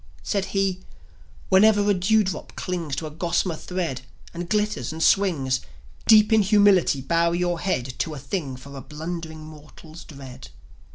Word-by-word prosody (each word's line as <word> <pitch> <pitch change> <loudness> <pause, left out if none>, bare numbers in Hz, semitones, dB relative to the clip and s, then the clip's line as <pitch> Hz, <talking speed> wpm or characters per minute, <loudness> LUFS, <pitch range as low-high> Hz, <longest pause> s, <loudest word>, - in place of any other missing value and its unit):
Said 200 -2 -1
he: 195 -2 -1 0.7
"Whenever 205 +1 +5
a 205 - +4
dewdrop 195 +1 0
clings 170 -6 -3
To 160 - -4
a 155 - -6
gossamer 170 +2 -1
thread, 165 -7 -4 0.3
and 170 0 -6
glitters 210 -3 -1
and 160 +1 -3
swings, 145 -10 +2 0.5
Deep 215 0 +6
in 220 - +6
humility 200 -8 +4
bow 170 +5 +1
your 175 -1 -1
head 130 -10 -2
To 155 - -2
a - - -7
thing 140 -2 -4
for 140 +2 -12
a 135 - -7
blundering 160 +1 -7
rnortal's 155 +2 -13
dread." 130 -3 -11
170 Hz, 155 wpm, -24 LUFS, 150-195 Hz, 0.7 s, Deep